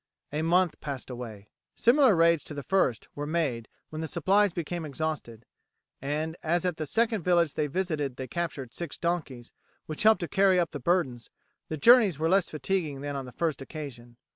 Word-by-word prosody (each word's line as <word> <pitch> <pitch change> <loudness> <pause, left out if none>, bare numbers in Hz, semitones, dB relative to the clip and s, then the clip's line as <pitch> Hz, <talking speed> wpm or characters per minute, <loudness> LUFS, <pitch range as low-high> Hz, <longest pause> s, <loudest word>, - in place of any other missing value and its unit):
A 150 - -1
month 175 +1 +2
passed 135 -3 -6
away. 110 -5 -8 0.3
Similar 250 -3 +5
raids 165 -1 +4
to 150 - -7
the 145 - -5
first 130 - +1
were 145 0 -5
made 145 -8 -1 0.2
when 155 0 -5
the 160 - -3
supplies 195 +6 +2
became 170 0 -4
exhausted, 150 -6 -4 0.6
and 155 +4 -2
as 170 +2 0
at 180 -3 -1
the 155 - -3
second 225 - +1
village 170 -3 +2
they 150 - -1
visited 150 -5 -2
they 130 0 -6
captured 150 -8 -4
six 170 -4 -5
donkeys, 150 -8 -3 0.3
which 155 - -5
helped 220 -1 +5
to 170 - -2
carry 190 +2 +3
up 170 - 0
the 145 - -5
burdens, 135 -7 0 0.4
the 155 - -3
journeys 220 - +6
were 160 +2 0
less 190 0 +3
fatiguing 155 -1 -2
than 145 0 -4
on 135 -1 -4
the 125 - -10
first 155 -1 -2
occasion. 125 -5 -9
155 Hz, 190 wpm, -28 LUFS, 140-175 Hz, 0.6 s, journeys